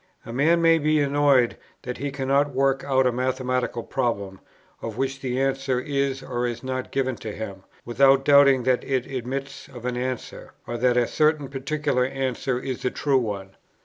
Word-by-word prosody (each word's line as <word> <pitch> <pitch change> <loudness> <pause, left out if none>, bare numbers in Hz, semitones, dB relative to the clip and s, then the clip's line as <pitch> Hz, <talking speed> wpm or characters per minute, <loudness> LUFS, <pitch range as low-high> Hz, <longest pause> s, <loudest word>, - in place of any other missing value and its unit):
A 115 - -7
man 165 +6 +3
may 165 0 +5
be 155 0 +2
annoyed 140 -3 +3 0.3
that 125 -1 -5
he 140 +2 -2
cannot 140 +1 0
work 135 0 +2
out 130 -1 +2
a 125 - +3
mathematical 125 -1 -1
problem, 100 -5 -2 0.4
of 115 -1 -6
which 135 +1 -2
the 130 -1 -2
answer 135 -1 0
is 140 -1 -1
or 125 -1 -2
is 120 0 -5
not 130 0 -4
given 130 -2 0
to 110 - -6
him, 100 -2 -7 0.2
without 135 +3 +4
doubting 140 -3 +6
that 125 0 +1
it 130 -2 -1
admits 135 +2 -5
of 125 -3 -11
an 125 -1 -1
answer, 125 0 -5
or 120 - -5
that 125 0 +3
a 120 - +4
certain 150 0 +1
particular 140 -1 -1
answer 130 -1 -2
is 130 -1 -5
the 125 - 0
true 135 0 +1
one. 100 -5 -4
130 Hz, 180 wpm, -24 LUFS, 125-140 Hz, 0.4 s, doubting